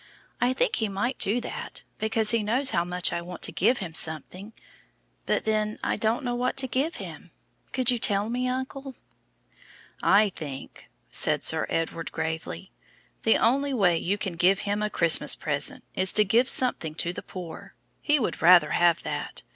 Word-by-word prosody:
I 245 - +3
think - - +1
He 220 -2 -1
might 205 +7 -3
do 215 +5 +2
that, - - -6 0.2
because 220 0 +1
He 230 -1 +1
knows 250 +6 +2
how 170 - +1
much 180 0 0
I 170 - -2
want 175 0 -10
to - - +2
give 235 +7 +2
Him 175 -5 -6
something. 165 +7 -2 0.8
But - - 0
then 215 -1 -1
I - - 0
don't 220 +6 0
know 245 -1 -2
what 250 +1 -2
to 265 -1 +2
give 270 +7 -1
Him. - - -9 0.4
Could 255 -1 +2
you 245 - -1
tell 205 -1 +1
me, 250 +2 -2
uncle?" 260 +1 -5 1.1
"I 205 +1 +4
think," 145 -7 -9 0.2
said - - +1
Sir - - +1
Edward, 165 0 -3
gravely, 160 - -5 0.5
"the 110 - +3
only 275 +4 +1
way 180 -7 +3
you 180 +5 -1
can 195 -3 -4
give 185 +3 +3
Him 205 0 -2
a 210 - -1
Christmas 165 -6 +5
present 145 -2 -1
is 185 0 +3
to 210 - +4
give 235 +6 +2
something 165 -11 +1
to 170 +1 -2
the - - -7
poor. 175 -4 -10 0.3
He 295 0 +2
would 250 - -3
rather 170 -3 +6
have 170 -1 +2
that. - - -5
210 Hz, 180 wpm, -26 LUFS, 170-245 Hz, 1.1 s, rather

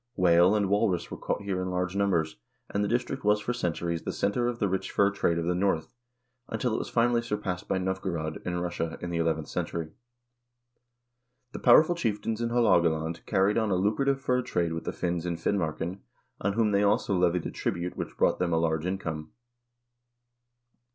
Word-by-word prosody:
Whale 90 +2 +5
and 105 -2 +2
walrus 95 -3 +1
were - - -5
caught - - -2
here 95 -2 -2
in 95 - -2
large 90 +1 -2
numbers, 90 -8 +1 0.3
and 100 - 0
the - - 0
district 120 +3 -1
was 105 0 +3
for 120 +4 -2
centuries 85 -6 -2
the - - -3
center 120 +4 0
of 120 -1 -2
the 105 - +1
rich 95 0 -2
fur 100 0 +3
trade 85 -4 0
of 85 - -1
the 90 - +1
North, 90 -4 0 0.6
until 125 -4 -1
it - - 0
was - - -5
finally 120 0 +2
surpassed 105 -6 -3
by - - 0
Novgorod, 95 -4 -3
in 90 -1 -2
Russia, 85 -2 -3
in 90 - -5
the 85 - -1
eleventh 80 -2 0
century. 80 -2 -3 1.6
The - - -6
powerful 155 +7 +6
chieftains 115 -7 -2
in 115 - 0
Haalogaland 85 -9 +2
carried 100 +2 +2
on 110 -2 0
a 95 - +2
lucrative 110 +9 +1
fur 125 -1 +1
trade 85 -8 -1
with 80 - -5
the - - -1
Finns 85 -1 -2
in 85 -1 -2
Fin 100 +4 0
marken, 85 +3 -3 0.4
on 100 +1 0
whom 110 -1 +2
they 100 0 +3
also 100 -1 +2
levied 90 -1 +2
a - - -3
tribute 85 +1 -3
which - - -6
brought - - +2
them 90 -1 0
a - - +3
large 80 0 0
income. 80 -5 -4
95 Hz, 195 wpm, -28 LUFS, 85-105 Hz, 1.6 s, powerful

